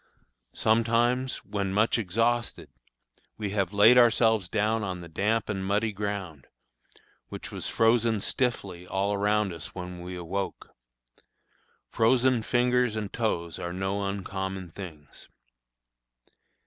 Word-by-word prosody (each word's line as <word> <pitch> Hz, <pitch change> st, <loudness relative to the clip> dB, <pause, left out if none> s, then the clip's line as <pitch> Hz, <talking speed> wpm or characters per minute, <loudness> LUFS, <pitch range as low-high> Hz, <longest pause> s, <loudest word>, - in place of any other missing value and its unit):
Sometimes, 120 Hz, +3 st, +1 dB
when 100 Hz, -1 st, -2 dB
much 110 Hz, +4 st, +2 dB
exhausted, 115 Hz, +4 st, 0 dB, 0.7 s
we 105 Hz, -3 st, -3 dB
have 100 Hz, -3 st, 0 dB
laid 110 Hz, +5 st, +7 dB
ourselves 110 Hz, -5 st, +4 dB
down 110 Hz, +3 st, +1 dB
on 90 Hz, -2 st, -4 dB
the 85 Hz, -, -9 dB
damp 105 Hz, +7 st, 0 dB
and 95 Hz, -2 st, -3 dB
muddy 105 Hz, +3 st, +1 dB
ground, 100 Hz, -8 st, -5 dB, 0.8 s
which -, -, -7 dB
was -, -, -5 dB
frozen 115 Hz, -1 st, +3 dB
stiffly 100 Hz, -7 st, -2 dB
all 100 Hz, +2 st, 0 dB
around 105 Hz, -1 st, +1 dB
us 80 Hz, 0 st, -9 dB
when 90 Hz, -1 st, -7 dB
we 90 Hz, +1 st, -6 dB
awoke. 90 Hz, +3 st, -4 dB, 1.2 s
Frozen 125 Hz, +1 st, +3 dB
fingers 125 Hz, 0 st, +2 dB
and 105 Hz, -2 st, -4 dB
toes 85 Hz, -8 st, -2 dB
are 85 Hz, -, -4 dB
no 95 Hz, +2 st, -2 dB
uncommon 95 Hz, -2 st, -4 dB
things. 80 Hz, -6 st, -11 dB
100 Hz, 120 wpm, -27 LUFS, 95-115 Hz, 1.2 s, laid